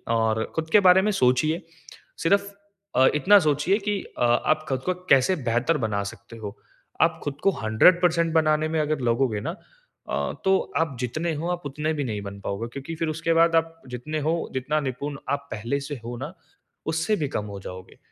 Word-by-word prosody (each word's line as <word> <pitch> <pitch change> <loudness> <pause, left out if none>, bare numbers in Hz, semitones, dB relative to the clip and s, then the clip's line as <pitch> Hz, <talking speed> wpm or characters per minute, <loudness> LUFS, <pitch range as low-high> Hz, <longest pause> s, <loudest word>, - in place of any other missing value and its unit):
और 110 -1 +1
खुद 160 0 -2
के 210 - +7
बारे 180 +1 +7
में 210 +2 +1
सोचिए। 155 +2 +2 0.6
सिर्फ़ 200 +4 +2 0.4
अ, 130 - +6
इतना 200 +8 +6
सोचिए 155 +4 +2
कि 205 -1 0 0.2
अ, - - 0
आप 155 +6 +2
खुद 130 -1 -1
को 185 - 0 0.2
कैसे 135 +7 +5
बेहतर 125 +8 +1
बना 100 -1 -1
सकते 100 +3 -14
हो। 105 0 -7 0.4
आप 165 0 +3
खुद 145 -1 -3
को 195 - +5
100% 170 +9 +4
बनाने 155 -1 +3
में 160 0 0
अगर 150 -1 -1
लगोगे 115 -2 +1
ना 165 - -4 0.5
अ, - - -1
तो 190 0 +5 0.2
आप 160 -4 0
जितने 155 +7 -2
हो 165 +4 -3
आप 175 0 -3
उतने 150 +3 -2
भी 145 -2 -2
नहीं 110 -5 -3
बन 100 0 -8
पाओगे। 100 +4 -3
क्योंकि 140 +4 -6
फिर 165 +1 -2
उसके 165 +2 0
बाद 165 0 +4
आप 165 0 0
जितने 125 +6 -4
हो, 155 +2 0 0.2
जितना 135 +4 0
निपुण 140 +1 -4
आप 140 0 -2
पहले 115 +6 -2
से 145 +1 -5
हो 120 +1 -5
ना 150 +7 -6 0.6
उससे 165 +6 +1
भी 145 - +1
कम 105 - -1
हो - - -6
जाओगे। 95 0 -10
150 Hz, 195 wpm, -25 LUFS, 125-165 Hz, 0.6 s, के